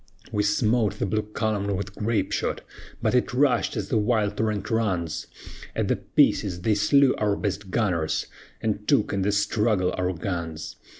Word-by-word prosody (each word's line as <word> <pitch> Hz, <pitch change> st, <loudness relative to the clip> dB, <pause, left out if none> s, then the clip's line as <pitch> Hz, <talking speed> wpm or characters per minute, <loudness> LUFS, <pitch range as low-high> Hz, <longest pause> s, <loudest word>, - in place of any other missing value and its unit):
"We 105 Hz, -, +1 dB
smote 105 Hz, +1 st, +2 dB
the -, -, -1 dB
blue 110 Hz, +2 st, 0 dB
column 105 Hz, -2 st, -2 dB
with 100 Hz, +1 st, -4 dB
grape 105 Hz, -2 st, -1 dB
shot, -, -, -1 dB, 0.4 s
But -, -, +2 dB
it 125 Hz, 0 st, +1 dB
rushed 135 Hz, -2 st, +2 dB
as 100 Hz, -2 st, -3 dB
the 110 Hz, -, +2 dB
wild 105 Hz, -2 st, +1 dB
torrent 105 Hz, -1 st, -1 dB
runs; 90 Hz, -8 st, -1 dB, 0.5 s
At -, -, 0 dB
the -, -, +2 dB
pieces 90 Hz, -4 st, +2 dB
they 110 Hz, +4 st, +2 dB
slew 130 Hz, +6 st, +4 dB
our 105 Hz, -1 st, +2 dB
best 100 Hz, -1 st, -3 dB
gunners, 90 Hz, -7 st, 0 dB, 0.4 s
And 105 Hz, -1 st, -2 dB
took 105 Hz, -, +2 dB
in 100 Hz, -, 0 dB
the 100 Hz, +2 st, +1 dB
struggle 105 Hz, -2 st, +1 dB
our 90 Hz, 0 st, +1 dB
guns. 85 Hz, -3 st, -5 dB
105 Hz, 170 wpm, -25 LUFS, 95-110 Hz, 0.5 s, slew